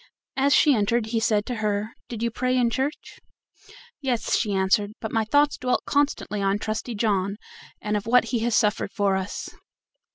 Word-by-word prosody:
As 275 Hz, +1 st, +2 dB
she 295 Hz, -, +5 dB
entered 225 Hz, +1 st, +1 dB
he 225 Hz, +1 st, -1 dB
said 215 Hz, -2 st, +1 dB
to 250 Hz, -, -3 dB
her: 210 Hz, 0 st, -1 dB, 0.2 s
"Did 230 Hz, -1 st, -5 dB
you 235 Hz, -, 0 dB
pray 255 Hz, +2 st, 0 dB
in 240 Hz, -2 st, +2 dB
church?" 270 Hz, +5 st, -3 dB, 0.8 s
"Yes," 250 Hz, -5 st, 0 dB
she 215 Hz, -3 st, 0 dB
answered, 200 Hz, +2 st, +1 dB
"but 220 Hz, -, -5 dB
my 225 Hz, -1 st, +1 dB
thoughts 290 Hz, +6 st, +2 dB
dwelt 250 Hz, 0 st, 0 dB
constantly 280 Hz, -7 st, 0 dB
on 195 Hz, 0 st, +1 dB
Trusty 220 Hz, +3 st, -4 dB
John, 200 Hz, -2 st, 0 dB, 0.4 s
and 210 Hz, 0 st, -2 dB
of 210 Hz, +1 st, -3 dB
what 250 Hz, +2 st, +5 dB
he 235 Hz, -, +2 dB
has 235 Hz, 0 st, 0 dB
suffered 210 Hz, -1 st, +1 dB
for 200 Hz, -2 st, +1 dB
us." 190 Hz, +1 st, -4 dB
220 Hz, 185 wpm, -24 LUFS, 205-245 Hz, 0.8 s, she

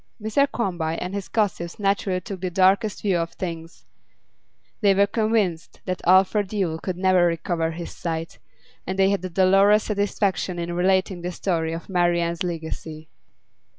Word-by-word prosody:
Mr 220 Hz, +6 st, +2 dB
Quarmby 170 Hz, -7 st, -2 dB
and 180 Hz, +2 st, -5 dB
his 200 Hz, -2 st, -4 dB
gossips 190 Hz, -6 st, -1 dB
naturally 195 Hz, -2 st, 0 dB
took 185 Hz, 0 st, -8 dB
the 185 Hz, -, -1 dB
darkest 195 Hz, +4 st, +2 dB
view 190 Hz, -4 st, +2 dB
of 165 Hz, 0 st, -3 dB
things; 165 Hz, -2 st, -7 dB, 1.0 s
they 200 Hz, -2 st, +4 dB
were 200 Hz, +1 st, +5 dB
convinced 210 Hz, -6 st, -1 dB
that 185 Hz, -1 st, -3 dB
Alfred 190 Hz, +2 st, +4 dB
Yule 180 Hz, -6 st, -1 dB
could 180 Hz, +1 st, -4 dB
never 185 Hz, -1 st, +4 dB
recover 165 Hz, 0 st, -1 dB
his 170 Hz, +1 st, -6 dB
sight, 165 Hz, -1 st, -4 dB, 0.5 s
and 190 Hz, +1 st, -3 dB
they 195 Hz, 0 st, +4 dB
had 200 Hz, -2 st, -1 dB
a 185 Hz, -, -3 dB
dolorous 195 Hz, +4 st, +4 dB
satisfaction 200 Hz, -3 st, -1 dB
in 170 Hz, 0 st, -3 dB
relating 185 Hz, 0 st, +1 dB
the 175 Hz, +1 st, -3 dB
story 165 Hz, -3 st, -1 dB
of 165 Hz, +1 st, -6 dB
Marian's 175 Hz, -2 st, +1 dB
legacy. 160 Hz, -2 st, -5 dB
185 Hz, 155 wpm, -23 LUFS, 170-195 Hz, 1.0 s, were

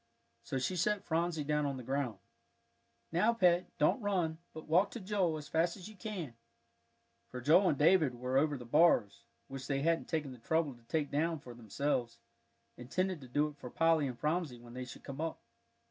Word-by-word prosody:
So 135 Hz, -, -3 dB
she 130 Hz, +8 st, -1 dB
set 200 Hz, +3 st, +1 dB
Phronsie 165 Hz, -2 st, 0 dB
down 150 Hz, 0 st, 0 dB
on 140 Hz, -1 st, -3 dB
the 125 Hz, -, -7 dB
ground. 130 Hz, -2 st, -2 dB, 0.9 s
"Now, 215 Hz, +8 st, +3 dB
Pet, 180 Hz, -4 st, +3 dB
don't 150 Hz, -, +3 dB
run, 180 Hz, -6 st, 0 dB
but 160 Hz, -, -9 dB
walk 180 Hz, +6 st, +4 dB
to 235 Hz, -, -7 dB
Joel 185 Hz, -5 st, 0 dB
as 150 Hz, -1 st, -8 dB
fast 170 Hz, +3 st, +1 dB
as 185 Hz, -, -9 dB
you 215 Hz, -, -13 dB
can," 180 Hz, -, -5 dB, 1.0 s
for 125 Hz, -, -6 dB
Joel 165 Hz, +9 st, +5 dB
and 145 Hz, -, +1 dB
David 155 Hz, -4 st, +4 dB
were 125 Hz, +2 st, -3 dB
over 145 Hz, +1 st, +3 dB
the 120 Hz, -, -9 dB
bars, 120 Hz, -6 st, +3 dB, 0.2 s
which 135 Hz, -1 st, -7 dB
they 140 Hz, 0 st, 0 dB
hadn't 165 Hz, +1 st, +1 dB
taken 150 Hz, -4 st, -1 dB
the 125 Hz, -, -11 dB
trouble 160 Hz, +3 st, 0 dB
to 120 Hz, -, -19 dB
take 145 Hz, +3 st, -1 dB
down 160 Hz, +3 st, +1 dB
for 125 Hz, -4 st, -11 dB
themselves, 120 Hz, +2 st, -2 dB, 0.6 s
intending 185 Hz, +8 st, -2 dB
to 130 Hz, -, -11 dB
do 145 Hz, +5 st, +1 dB
it 145 Hz, -, -14 dB
for 125 Hz, -3 st, -8 dB
Polly 165 Hz, 0 st, +3 dB
and 125 Hz, -2 st, -5 dB
Phronsie 150 Hz, -1 st, -1 dB
when 120 Hz, 0 st, -13 dB
they 130 Hz, 0 st, -5 dB
should 125 Hz, -, -11 dB
come 140 Hz, +1 st, -6 dB
up. 165 Hz, 0 st, -3 dB
150 Hz, 200 wpm, -33 LUFS, 130-170 Hz, 1.0 s, Joel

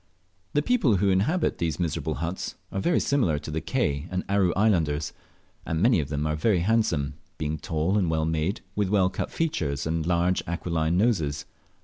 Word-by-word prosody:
The 145 Hz, -, +2 dB
people 190 Hz, -, +3 dB
who 100 Hz, +1 st, +2 dB
inhabit 140 Hz, -, +1 dB
these 80 Hz, -2 st, -1 dB
miserable 85 Hz, -4 st, -1 dB
huts 85 Hz, +3 st, -4 dB, 0.2 s
are 95 Hz, -, -2 dB
very 175 Hz, -, +2 dB
similar 120 Hz, -, +1 dB
to 75 Hz, +1 st, -6 dB
the 80 Hz, +1 st, -2 dB
Ke 70 Hz, +2 st, -1 dB
and 90 Hz, 0 st, -2 dB
Aru 95 Hz, -3 st, +2 dB
islanders, 85 Hz, -8 st, +1 dB, 0.5 s
and 80 Hz, -, -2 dB
many 115 Hz, +1 st, +4 dB
of 70 Hz, -2 st, -3 dB
them 75 Hz, 0 st, -2 dB
are 75 Hz, 0 st, 0 dB
very 90 Hz, +3 st, +2 dB
handsome, 85 Hz, -9 st, +1 dB, 0.2 s
being 75 Hz, 0 st, -2 dB
tall 80 Hz, +6 st, 0 dB
and 90 Hz, -4 st, +1 dB
well 80 Hz, -1 st, +1 dB
made, 80 Hz, +4 st, -1 dB
with 105 Hz, -2 st, 0 dB
well 95 Hz, -2 st, +3 dB
cut -, -, -3 dB
features 75 Hz, -, -1 dB
and 80 Hz, 0 st, -1 dB
large 90 Hz, +2 st, +1 dB
aquiline 85 Hz, -1 st, 0 dB
noses. 80 Hz, -10 st, +1 dB
85 Hz, 180 wpm, -26 LUFS, 80-100 Hz, 0.5 s, many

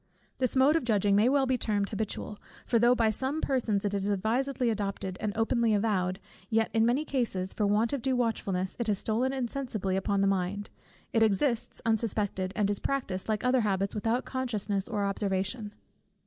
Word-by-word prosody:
This 255 Hz, -1 st, 0 dB
mode 270 Hz, +4 st, +5 dB
of 330 Hz, -, +1 dB
judging 205 Hz, -4 st, +2 dB
may 215 Hz, +4 st, +4 dB
well 275 Hz, 0 st, +3 dB
be 260 Hz, -1 st, 0 dB
termed 205 Hz, -3 st, 0 dB
habitual: 215 Hz, -1 st, -4 dB, 0.3 s
for 235 Hz, -, +2 dB
though 240 Hz, +2 st, +5 dB
by 225 Hz, -2 st, +2 dB
some 265 Hz, +7 st, 0 dB
persons 230 Hz, -9 st, 0 dB
it 205 Hz, -, -1 dB
is 200 Hz, 0 st, -1 dB
advisedly 235 Hz, +5 st, 0 dB
adopted, 195 Hz, -3 st, -3 dB
and 215 Hz, -, -1 dB
openly 225 Hz, -1 st, +2 dB
avowed, 190 Hz, -4 st, 0 dB, 0.3 s
yet 225 Hz, 0 st, +1 dB
in 225 Hz, 0 st, +3 dB
many 265 Hz, +6 st, +1 dB
cases 225 Hz, -10 st, -1 dB
for 210 Hz, -, 0 dB
want 215 Hz, +4 st, +2 dB
of 280 Hz, -, -1 dB
due 260 Hz, +1 st, 0 dB
watchfulness, 195 Hz, -6 st, -1 dB
it 235 Hz, -, -1 dB
has 210 Hz, -2 st, +2 dB
stolen 230 Hz, +6 st, 0 dB
insensibly 240 Hz, -7 st, -2 dB
upon 195 Hz, +1 st, 0 dB
the -, -, +3 dB
mind; 195 Hz, +1 st, -1 dB, 0.4 s
it 225 Hz, -, +3 dB
exists 225 Hz, +3 st, +1 dB
unsuspected, 210 Hz, -4 st, 0 dB
and 205 Hz, -1 st, +1 dB
is 205 Hz, -, -1 dB
practised, 220 Hz, -9 st, -2 dB
like 215 Hz, -1 st, 0 dB
other 250 Hz, 0 st, +3 dB
habits, 195 Hz, -2 st, 0 dB
without 225 Hz, +4 st, -1 dB
consciousness 210 Hz, -6 st, -2 dB
or 210 Hz, -3 st, -1 dB
observation. 200 Hz, +2 st, -1 dB
220 Hz, 185 wpm, -29 LUFS, 200-245 Hz, 0.4 s, mode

